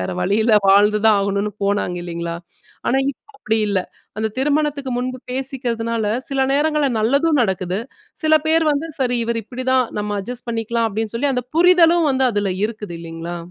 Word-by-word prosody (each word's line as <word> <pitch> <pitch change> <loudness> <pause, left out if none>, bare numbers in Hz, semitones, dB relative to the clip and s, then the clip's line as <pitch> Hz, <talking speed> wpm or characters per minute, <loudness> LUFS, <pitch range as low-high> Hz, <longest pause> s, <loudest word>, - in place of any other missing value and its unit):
வேற 90 - -3
வழியில்ல 220 +2 +2
வாழ்ந்துதான் 210 +2 +5
ஆகணும்னு 200 +1 -1
போனாங்க 200 -3 0
இல்லீங்களா? 170 -1 -4 0.5
ஆனா, 265 - +2
இப்போ 435 - -17
அப்டி 220 - 0
இல்ல. 200 -2 +1 0.4
அந்த 220 0 0
திருமணத்துக்கு 290 -1 0
முன்பு 255 +1 -3
பேசிக்கிறதுனால 240 -4 -2 0.2
சில 275 -1 -1
நேரங்கள்ல 295 0 +2
நல்லதும் 280 +6 +2
நடக்குது. 190 -2 -1 0.4
சில 310 0 +5
பேர் 325 0 +3
வந்து 290 +3 -2
சரி 245 -2 +1
இவர் 230 0 -1
இப்டிதான் 255 +3 0 0.2
நம்ம 205 0 -2
அட்ஜஸ்ட் 245 +4 -7
பண்ணிக்கலாம், 230 0 -1
அப்டின்னு 220 +2 -3
சொல்லி 275 +3 +1
அந்த 250 - -2
புரிதலும் 340 -2 +5
வந்து 265 0 +2
அதுல 205 -2 0
இருக்குது 210 -5 -5
இல்லைங்களா? 165 +1 -6
230 Hz, 155 wpm, -20 LUFS, 205-275 Hz, 0.5 s, வாழ்ந்துதான்